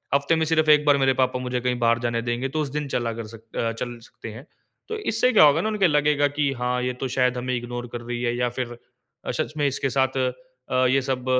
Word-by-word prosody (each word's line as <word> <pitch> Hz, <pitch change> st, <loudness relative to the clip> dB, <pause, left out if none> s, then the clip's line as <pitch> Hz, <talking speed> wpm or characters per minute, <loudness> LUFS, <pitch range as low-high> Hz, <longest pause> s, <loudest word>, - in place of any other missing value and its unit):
हफ़्ते 140 Hz, +3 st, +2 dB
में 160 Hz, 0 st, +1 dB
सिर्फ़ 160 Hz, -1 st, +2 dB
1 150 Hz, 0 st, +5 dB
बार 145 Hz, -1 st, +5 dB
मेरे 135 Hz, -1 st, +3 dB
पापा 130 Hz, 0 st, +1 dB
मुझे 125 Hz, -1 st, -2 dB
कहीं 125 Hz, 0 st, 0 dB
बाहर 115 Hz, 0 st, +3 dB
जाने 120 Hz, -1 st, -1 dB
देंगे, 120 Hz, +3 st, -2 dB
तो 155 Hz, +3 st, -1 dB
उस 145 Hz, -, -2 dB
दिन 150 Hz, -1 st, -3 dB
चला 120 Hz, -2 st, -1 dB
कर 115 Hz, -1 st, -6 dB
सक 115 Hz, 0 st, -18 dB
अ, 115 Hz, 0 st, 0 dB
चल 120 Hz, +1 st, -5 dB
सकते 115 Hz, -, -10 dB
हैं। 125 Hz, +7 st, -11 dB, 0.4 s
तो 445 Hz, -, -3 dB
इससे 225 Hz, +3 st, +2 dB
क्या 210 Hz, -, +7 dB
होगा 150 Hz, +2 st, +5 dB
ना, 215 Hz, -, -1 dB
उनको 210 Hz, -3 st, +1 dB
लगेगा 150 Hz, -1 st, +3 dB
कि, 145 Hz, 0 st, 0 dB
"हाँ, 125 Hz, 0 st, -1 dB
ये 125 Hz, -, -1 dB
तो 125 Hz, +2 st, -4 dB
शायद 125 Hz, -1 st, +2 dB
हमें 125 Hz, +1 st, -2 dB
इग्नोर 120 Hz, 0 st, -5 dB
कर 120 Hz, -, -4 dB
रही 120 Hz, 0 st, -4 dB
है 120 Hz, 0 st, 0 dB
या 125 Hz, 0 st, +1 dB
फिर 120 Hz, -1 st, -4 dB, 0.5 s
अ, -, -, 0 dB
सच -, -, -3 dB
में 145 Hz, -, +1 dB
इसके 135 Hz, 0 st, -1 dB
साथ 130 Hz, 0 st, +1 dB, 0.6 s
अ, 130 Hz, 0 st, +3 dB
ये 135 Hz, +2 st, +3 dB
सब 130 Hz, -1 st, -3 dB
130 Hz, 260 wpm, -24 LUFS, 120-145 Hz, 0.6 s, क्या